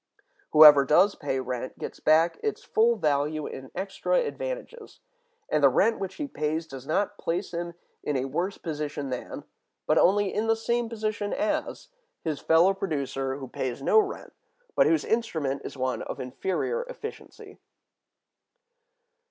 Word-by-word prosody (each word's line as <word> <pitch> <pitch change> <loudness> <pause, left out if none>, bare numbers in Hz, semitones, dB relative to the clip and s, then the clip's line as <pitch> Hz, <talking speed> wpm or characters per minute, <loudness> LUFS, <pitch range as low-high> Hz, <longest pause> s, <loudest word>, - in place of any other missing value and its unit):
Whoever 150 -2 +9
does 180 +8 +4
pay 140 -3 -3
rent 125 0 -5
gets - - -7
back 160 +2 +3
its 435 -1 -3
full 230 +2 +3
value 150 -4 0
in 130 0 -8
extra 195 - -2
advantages, - - -4 0.5
and 150 - 0
the 140 - +8
rent 220 - +2
which 190 -1 -5
he 295 - -4
pays 160 - -2
does 135 -3 -10
not 200 +5 -1
place 175 +3 -2
him 170 0 -4 0.3
in 145 - -1
a 130 - -1
worse 175 +9 -2
position 150 -4 -4
than, 125 - -5 0.4
but - - +3
only 200 +1 +3
in 220 +1 -1
the 225 - +4
same 235 +1 -1
position 215 -2 -3
as, 310 - -2 0.3
his 155 -4 -2
fellow 170 +4 +4
producer 140 -7 -3
who 135 -1 -7
pays 125 0 -4
no 440 - +5
rent, 415 -1 -3 0.4
but - - +5
whose 325 - +2
instrument 160 - -1
is - - -8
one 130 0 -1
of - - -6
inferior 185 - -2
efficiency. 450 -3 -9
170 Hz, 150 wpm, -27 LUFS, 140-225 Hz, 0.5 s, Whoever